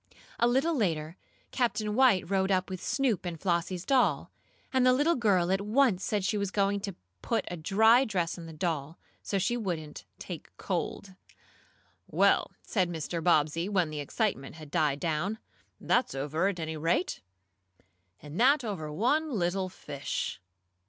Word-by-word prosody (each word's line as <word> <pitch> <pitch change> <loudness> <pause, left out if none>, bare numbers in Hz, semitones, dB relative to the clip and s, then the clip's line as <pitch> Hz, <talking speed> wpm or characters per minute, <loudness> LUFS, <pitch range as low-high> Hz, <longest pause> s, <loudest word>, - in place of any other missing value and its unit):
A 235 - +4
little 270 +7 +2
later 165 - -1 0.4
Captain 225 -4 0
White 240 -7 +4
rowed 190 0 +1
up 185 -1 +1
with 185 - -5
Snoop 260 -8 0
and 175 -3 -5
Flossie's 175 0 -1
doll, 195 - +2 0.4
and 260 -1 +3
the 255 0 +6
little 295 +6 +3
girl 190 - +2
at 195 +1 +1
once 210 -2 +2
said 205 -3 -1
she 210 +1 0
was 200 -1 -1
going 200 0 +1
to 195 -2 -5 0.3
put 230 - -1
a - - -3
dry 220 +9 +4
dress 180 -8 -1
on 170 -2 -9
the - - -8
doll, 155 -2 -3 0.2
so 200 - -2
she 195 +5 +1
wouldn't 170 -9 -4
"take - - -8
cold." 195 -1 -3 0.9
"Well," - - +3
said 185 -5 0
Mr. 165 0 -4
Bobbsey, 165 +2 +2
when 180 -6 +1
the 150 - -4
excitement 145 - -2
had 155 -2 -11
died 145 -1 +1
down. 175 +6 -1 0.4
"That's 245 - +1
over, 150 +7 0
at 195 -3 -2
any 160 -1 -4
rate. 170 +3 0 1.0
All 145 - -10
that 255 - +4
over 175 -9 -4
one 285 - +1
little 190 -5 -1
fish!" 140 - -5
185 Hz, 160 wpm, -29 LUFS, 165-220 Hz, 1.0 s, the